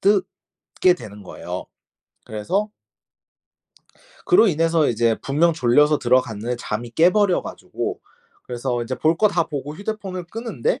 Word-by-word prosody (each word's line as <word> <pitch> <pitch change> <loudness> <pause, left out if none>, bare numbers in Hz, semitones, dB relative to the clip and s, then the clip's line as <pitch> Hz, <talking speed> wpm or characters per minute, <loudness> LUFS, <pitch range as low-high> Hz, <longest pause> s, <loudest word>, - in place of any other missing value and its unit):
뜨게 190 -2 +1
되는 105 -4 -11
거예요. 95 - -7 0.6
그래서 190 - -2 1.5
그로 295 - +6
인해서 165 -1 +2
이제 115 -1 +2
분명 160 +5 +2
졸려서 150 +2 +3
들어갔는데 120 -2 +1
잠이 115 +1 -4
깨 165 +8 +4
버려 200 -2 +2
가지고 - - -5 0.4
그래서 120 0 -3
이제 130 +2 -3
볼 160 +1 +2
거 215 - +4
다 175 -4 +1
보고 145 0 -5
휴대폰을 200 -3 -5
끄는데 230 - -3
155 Hz, 290 characters per minute, -22 LUFS, 120-190 Hz, 1.5 s, 그로